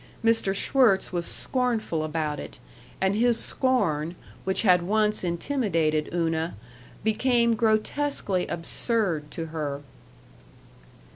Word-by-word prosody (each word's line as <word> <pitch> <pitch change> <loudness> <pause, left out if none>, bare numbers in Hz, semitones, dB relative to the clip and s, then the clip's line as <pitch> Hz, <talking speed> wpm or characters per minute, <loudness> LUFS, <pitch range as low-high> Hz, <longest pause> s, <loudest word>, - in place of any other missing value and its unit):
Mr. 225 -4 +2
Schwirtz 225 -3 +3
was 175 -1 -1
scornful 235 -11 -1
about 155 -1 -2
it, - - -9 0.4
and 190 0 +2
his 235 +1 +3
scorn, 170 - +1 0.3
which 190 +3 0
had 180 -4 +5
once 210 +3 +1
intimidated 170 - 0
Una, 165 -1 -1 0.5
became 235 +2 +2
grotesquely 220 -2 0
absurd 170 -3 -1
to 165 - -5
her. 145 -3 -4
190 Hz, 100 wpm, -26 LUFS, 165-230 Hz, 0.5 s, had